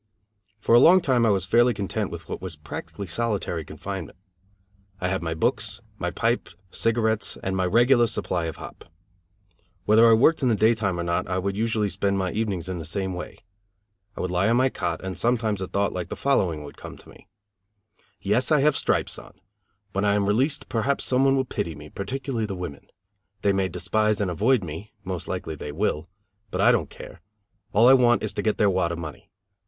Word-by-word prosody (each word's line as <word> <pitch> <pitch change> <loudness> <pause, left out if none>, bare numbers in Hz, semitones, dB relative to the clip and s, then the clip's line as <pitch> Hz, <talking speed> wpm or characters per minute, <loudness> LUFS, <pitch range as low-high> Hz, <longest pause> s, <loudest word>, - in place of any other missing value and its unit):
For 105 - +1
a 120 - +9
long 175 +8 +7
time 130 -8 +2
I - - +4
was 95 -3 +2
fairly 120 +3 +3
content 100 -1 -2
with - - -8
what - - -5
was 90 -3 -6
practically 75 +6 -7
solitary 100 -4 -2
confinement. 95 +5 -7 0.8
I 90 - -1
had 95 0 -1
my 80 -1 -3
books, 80 - -1 0.2
my - - -1
pipe, - - -1 0.2
cigarettes 110 -2 0
and 95 0 -1
my 95 -1 +1
regular 120 +4 +4
supply 90 -5 -2
of 80 - -4
hop. - - -11 1.0
Whether 115 +2 +6
I - - +7
worked 135 +9 +4
in 130 - +2
the 115 - +3
daytime 110 -4 +2
or - - -1
not 85 +1 -1
I 90 +1 -1
would 95 +1 -2
usually 110 -1 0
spend 100 +1 -1
my 95 -2 -1
evenings 100 -5 -2
in 90 -2 -4
the - - -5
same 95 +4 -3
way. 90 - -8 0.7
I - - -3
would 90 - -2
lie 90 +4 +2
on 115 - +3
my 130 +1 +3
cot 85 -8 -3
and 95 -1 -4
sometimes 115 -4 0
a 95 - -3
thought 100 +1 0
like 90 -2 -4
the - - -4
following 90 - 0
would 70 - -11
come - - -10
to - - -18
me: - - -17 0.9
"Yes, 130 +5 +1
I 150 -3 +5
have 150 0 +3
stripes - - 0
on. - - -16 0.5
When 100 +1 -1
I 100 0 +3
am 100 -1 +1
released 125 +9 +1
perhaps 125 +5 0
some 130 +1 +3
one 135 0 +4
will 130 -1 +1
pity 95 -9 -4
me, 75 +1 -11
particularly 120 +2 -3
the 100 - -4
women. 90 -6 -7 0.6
They 100 - +3
may 95 -1 +1
despise 105 +4 0
and 100 -3 0
avoid 110 +6 +2
me, 90 +6 -8
most 90 -2 -5
likely 90 -4 -4
they 75 -1 -6
will. 80 -1 -2 0.4
But - - -4
I - - +6
don't - - 0
care. - - -12 0.5
All 115 +4 +5
I 130 - +9
want 120 -2 +4
is - - -3
to - - -2
get 110 - 0
their 105 - +3
wad 95 -3 +1
of 85 - -4
money. 80 -5 -8
100 Hz, 210 wpm, -25 LUFS, 90-115 Hz, 1.0 s, a